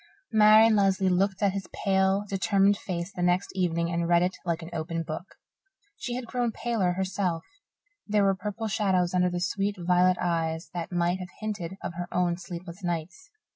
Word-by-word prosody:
Marian 215 +1 +7
Lesley 195 -2 +3
looked 195 +2 +1
at 200 - +4
his 195 0 -5
pale, 190 0 +1
determined 195 +1 +3
face 180 -1 -5
the 180 - -5
next 180 +2 +1
evening 170 -2 0
and 170 0 0
read 175 0 +5
it 185 +1 -1
like 170 -1 -2
an 165 - -9
open 165 +1 -3
book. 160 +4 -7 0.6
She 240 - -4
had 250 -1 -4
grown 240 0 -1
paler 215 -6 0
herself; 185 -3 -1 0.6
there 210 -1 +2
were 195 0 +4
purple 210 +3 -4
shadows 190 -4 +1
under 180 0 +3
the 175 0 -3
sweet 195 +3 -1
violet 180 +1 +3
eyes 165 -1 -1
that 170 -1 -4
might 175 +1 +1
have 180 -1 -7
hinted 200 -4 -4
of - - -4
her 175 +1 -5
own 180 -1 +1
sleepless 180 +1 -8
nights. 175 - -4
185 Hz, 180 wpm, -27 LUFS, 175-200 Hz, 0.6 s, Marian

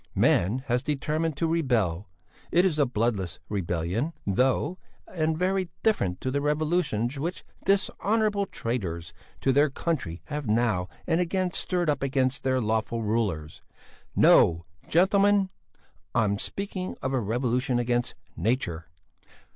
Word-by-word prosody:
Man 110 +9 +2
has 125 -1 +1
determined 150 +2 -1
to 165 - 0
rebel; 115 - 0 0.4
it 175 +3 +4
is 160 -5 +1
a 145 - +4
bloodless 105 -7 -1
rebellion, 95 - -1
though, 130 - +1 0.3
and 160 -2 0
very 185 0 0
different 95 - +1
to 130 - -1
the 140 +1 0
revolutions 150 -5 0
which 170 +5 -4 0.2
dishonourable 200 +1 +1
traitors 90 - -4 0.3
to 135 - +3
their 145 +3 +4
country 130 - -3
have 150 -3 -4
now 105 -5 +1 0.2
and 165 +2 +2
again 180 +1 0
stirred 180 -1 0
up 145 -3 +1
against 135 0 +1
their 130 -1 +1
lawful 110 0 -1
rulers. 100 -9 -1 0.5
No! 85 0 +5 0.2
gentlemen! 195 +2 +4 0.6
I'm 105 -3 +2
speaking 195 - -4
of 130 +1 -1
a 130 - +2
revolution 125 +3 0
against 120 0 0 0.2
nature! 95 -9 -1
130 Hz, 130 wpm, -27 LUFS, 110-165 Hz, 0.6 s, No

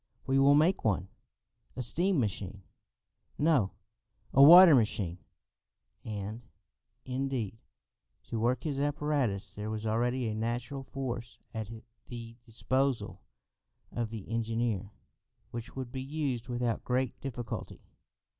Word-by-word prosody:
"We 135 +1 +2
will 140 +1 +6
make 160 +6 +3
one." 95 -3 0 0.7
"A 130 - -2
steam 175 +7 +2
machine?" 100 -3 -3 0.7
"No, 145 -11 +3 0.6
a 135 - +6
water 170 +3 +11
machine." 105 -8 +1 0.8
And, 105 +2 -5 0.6
indeed, 125 -5 -3 0.6
to 115 - -4
work 120 +2 +1
his 145 -4 -2
apparatus 145 -8 0
there 105 +1 -5
was 110 0 -4
already 120 +3 0
a 110 - -2
natural 120 +5 -3
force 125 -3 -5 0.2
at 110 -2 -4 0.4
the 115 -1 -8
disposal 115 -4 -1 0.7
of 120 -2 -2
the 110 -3 -7
engineer 115 -3 -1 0.6
which 120 +1 -6
could 130 -2 -6
be 130 -1 -4
used 135 -4 -3
without 120 -1 -1
great 130 0 -1
difficulty. 120 -3 -6
120 Hz, 115 wpm, -31 LUFS, 110-135 Hz, 0.8 s, water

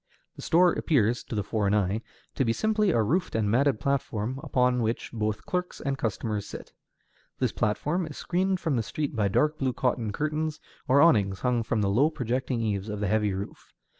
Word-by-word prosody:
The - - -10
store 175 +1 +4
appears, 120 - +1
to - - -5
the 105 - 0
foreign 105 -1 0
eye, 105 +1 +1 0.3
to - - 0
be 115 -2 +1
simply 215 - +1
a 115 -10 +3
roofed 170 - 0
and 105 -2 +1
matted 135 0 +2
platform 130 -3 -1
upon 125 -5 +1
which 115 +1 -2
both 110 -2 -2
clerks 180 0 -3
and 140 -2 -2
customers 110 -4 -3
sit. - - -9 0.6
This - - 0
platform 150 - -1
is 150 - -9
screened 185 +1 0
from 160 -7 0
the - - +2
street 145 +5 -3
by 105 -3 +2
dark 150 +10 +1
blue 130 -2 0
cotton 120 -3 -1
curtains 155 +4 -2 0.3
or 140 +2 +5
awnings 100 - +4
hung 125 -2 +1
from 110 -1 -1
the 100 - +1
low 135 +9 +4
projecting 125 -3 -2
eaves 105 -2 -2
of 105 -1 -4
the 105 - -1
heavy 105 -1 +2
roof. 100 +1 -8
125 Hz, 195 wpm, -27 LUFS, 105-150 Hz, 0.6 s, or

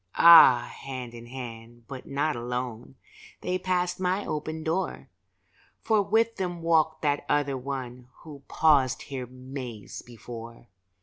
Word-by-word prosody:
Ah, 160 -8 +8
hand 130 -3 -7
in 120 0 -10
hand, 120 -2 -9
but 135 -2 -9
not 145 +1 -1
alone, 125 +1 -5 0.5
They 185 0 -2
passed 180 0 -1
my 185 +2 0
open 155 +1 -4
door, 170 +4 -2 0.7
For 220 -2 +3
with 225 +3 +1
them 175 -3 -4
walked 160 -1 +2
that 145 -1 +1
other 145 -2 +1
one 125 -2 -6 0.2
Who 150 -4 -11
paused 140 -5 +3
here 130 -3 -6
Mays 125 -3 -8
before. 115 0 -11
135 Hz, 130 wpm, -27 LUFS, 125-165 Hz, 0.7 s, Ah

